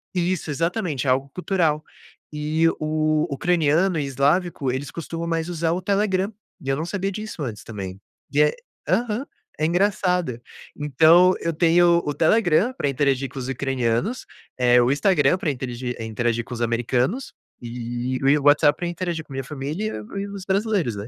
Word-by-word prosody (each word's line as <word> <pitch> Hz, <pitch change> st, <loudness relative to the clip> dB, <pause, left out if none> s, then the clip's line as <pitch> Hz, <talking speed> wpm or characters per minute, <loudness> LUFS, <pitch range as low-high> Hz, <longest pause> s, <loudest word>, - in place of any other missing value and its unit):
Isso, 180 Hz, -2 st, -1 dB
exatamente, 165 Hz, -, -1 dB
é -, -, +3 dB
algo 135 Hz, +2 st, 0 dB
cultural. 170 Hz, -5 st, 0 dB, 0.5 s
E 155 Hz, +2 st, +1 dB
o 155 Hz, +1 st, +1 dB
ucraniano 170 Hz, +2 st, +2 dB
e 145 Hz, -, -1 dB
eslávico, 140 Hz, +1 st, +1 dB
eles 140 Hz, +3 st, -4 dB
costumam 165 Hz, 0 st, -5 dB
mais 165 Hz, 0 st, -1 dB
usar 165 Hz, -1 st, -1 dB
o 185 Hz, -, -2 dB
Telegram 200 Hz, +1 st, +1 dB, 0.3 s
e 135 Hz, -, -11 dB
eu 135 Hz, -, +2 dB
não 160 Hz, -, -2 dB
sabia 195 Hz, +2 st, -2 dB
disso 215 Hz, -4 st, -6 dB
antes 110 Hz, -5 st, -5 dB
também. 95 Hz, -3 st, -7 dB, 0.3 s
E 150 Hz, -, +4 dB
é, 150 Hz, 0 st, +4 dB, 0.3 s
aham, 225 Hz, -, 0 dB, 0.3 s
é 155 Hz, -, +2 dB
engraçado. 180 Hz, -, +1 dB, 0.4 s
Então 160 Hz, +6 st, +5 dB
eu 165 Hz, -, -1 dB
tenho 170 Hz, +1 st, +4 dB
o 145 Hz, -, -1 dB
Telegram 175 Hz, -, +3 dB
pra 145 Hz, -, -1 dB
interagir 135 Hz, -1 st, 0 dB
com 135 Hz, -, -8 dB
os 130 Hz, -, -5 dB
ucranianos, 135 Hz, -, -1 dB, 0.3 s
eh 125 Hz, 0 st, +5 dB
o 120 Hz, -, +3 dB
Instagram 145 Hz, +2 st, +3 dB
pra 165 Hz, -, -2 dB
interegir 125 Hz, -1 st, -4 dB
interagir 115 Hz, +1 st, -1 dB
com -, -, -8 dB
os 120 Hz, -, -5 dB
americanos 120 Hz, -, 0 dB, 0.3 s
e 120 Hz, +1 st, -4 dB
e 150 Hz, -, +5 dB
o 140 Hz, -, -7 dB
WhatsApp 145 Hz, 0 st, +5 dB
pra 175 Hz, -, -3 dB
interagir 170 Hz, -2 st, -3 dB
com 140 Hz, -, -12 dB
a -, -, -6 dB
minha 135 Hz, -, -3 dB
família 150 Hz, +10 st, -3 dB, 0.2 s
e 195 Hz, -, -1 dB
e 200 Hz, -, -4 dB
os 200 Hz, -2 st, -7 dB
brasileiros, 195 Hz, -, 0 dB
né. 100 Hz, +2 st, -6 dB
155 Hz, 175 wpm, -23 LUFS, 135-180 Hz, 0.5 s, Então